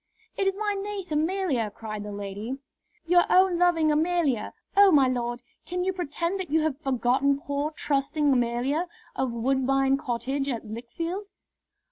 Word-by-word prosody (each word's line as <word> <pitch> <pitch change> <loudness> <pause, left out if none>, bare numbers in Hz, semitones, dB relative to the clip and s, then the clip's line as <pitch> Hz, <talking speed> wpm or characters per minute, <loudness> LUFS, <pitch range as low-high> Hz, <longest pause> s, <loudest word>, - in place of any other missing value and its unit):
"It 390 - 0
is 390 0 0
my 415 -1 0
niece 395 -3 -5
Amelia," 310 - 0
cried 215 0 -7
the 210 0 -6
lady, 205 +5 -5 0.5
"your 350 +1 +5
own 370 -1 +4
loving 330 -3 +3
Amelia! 305 -7 +1 0.2
Oh, 400 -1 +7
my 280 -5 +5
lord, 240 -1 -2 0.2
can 360 0 -3
you 380 +1 0
pretend 350 +2 -2
that 370 - -4
you 315 +2 +3
have 310 -3 -1
forgotten 270 +1 +2
poor, 285 0 -2
trusting 295 -1 0
Amelia, 250 +7 0 0.3
of 260 -2 -1
Woodbine 270 +3 +2
Cottage 270 +1 -2
at 235 -4 -3
Lichfield." 330 - -5
285 Hz, 150 wpm, -26 LUFS, 245-350 Hz, 0.5 s, Oh